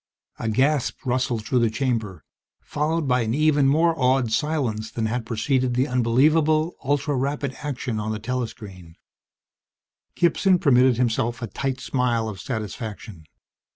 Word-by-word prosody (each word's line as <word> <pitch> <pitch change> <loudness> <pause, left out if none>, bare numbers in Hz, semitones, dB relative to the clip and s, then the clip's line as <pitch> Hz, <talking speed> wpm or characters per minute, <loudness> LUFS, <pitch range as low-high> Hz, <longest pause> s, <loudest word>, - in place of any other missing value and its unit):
_ - - -6
A 115 - 0
gasp 135 +4 0
rustled 125 -3 -1
through 125 - +1
the 115 -1 +2
chamber, 110 -5 -2 0.4
followed 155 +1 -2
by 125 -1 +2
an 115 +1 -1
even 150 -2 +3
more 165 +4 +3
awed 130 -2 +2
silence 120 -7 -1
than 110 0 -3
had 115 +1 -2
preceded 125 +2 0
the 130 +3 +2
unbelievable, 150 +6 +2
ultra 145 +1 0
rapid 140 +1 -2
action 130 -6 -3
on 105 +1 -3
the 110 - -2
telescreen. 105 -7 -6 1.2
Gibson 180 +2 +3
permitted 130 - +4
himself 120 -1 0
a - - 0
tight 130 +2 -3
smile 120 -5 0
of 100 -4 -6
satisfaction. 110 - -6
125 Hz, 145 wpm, -23 LUFS, 110-145 Hz, 1.2 s, permitted